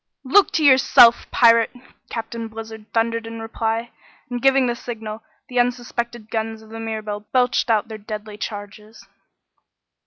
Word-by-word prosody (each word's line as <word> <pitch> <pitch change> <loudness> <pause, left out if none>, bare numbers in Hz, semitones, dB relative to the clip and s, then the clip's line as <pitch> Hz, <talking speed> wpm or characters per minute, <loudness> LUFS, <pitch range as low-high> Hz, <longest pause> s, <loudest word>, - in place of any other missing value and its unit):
"Look 335 +10 +4
to 315 - +1
yourself, 255 -3 +6
pirate!" 230 -1 +5 0.4
Captain 230 0 -5
Blizzard 220 -1 -9
thundered 230 0 0
in 230 0 -7
reply, 225 +1 -3 0.4
and 245 -1 -3
giving 270 0 +4
the 240 - 0
signal, 225 -3 -7 0.3
the 250 -1 -1
unsuspected 240 -2 -2
guns 220 0 -3
of 220 - -17
the 225 0 -8
Mirabelle 215 -2 -5
belched 250 -1 +2
out 220 -2 +2
their 220 -1 -8
deadly 210 0 -7
charges. 210 0 -8
225 Hz, 145 wpm, -21 LUFS, 220-240 Hz, 0.4 s, yourself